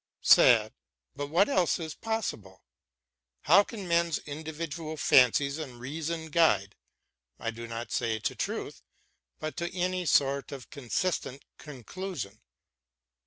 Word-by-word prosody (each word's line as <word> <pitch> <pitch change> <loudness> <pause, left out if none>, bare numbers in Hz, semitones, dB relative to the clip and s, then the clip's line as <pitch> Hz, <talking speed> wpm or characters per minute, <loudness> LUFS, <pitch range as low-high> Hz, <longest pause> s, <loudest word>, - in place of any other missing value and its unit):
Sad, - - +6 0.4
but 145 +1 -4
what 170 +7 +3
else 185 -11 +2
is 160 -3 -5
possible? 110 - -4 0.8
How 180 +8 +6
can 205 -4 -8
men's 170 -2 +2
individual 155 +1 -6
fancies 140 +2 +4
and 130 -6 -7
reason 160 +4 -4
guide, 105 - +3 0.6
I 115 - -3
do 115 +1 -8
not 115 +1 -6
say 110 -1 0
to 105 - -2
truth, - - -4 0.6
but 155 0 -5
to 170 0 -3
any 180 -1 -1
sort 140 -1 +2
of 135 -3 -9
consistent 140 0 -3
conclusion 140 - -7
150 Hz, 120 wpm, -29 LUFS, 125-170 Hz, 0.8 s, Sad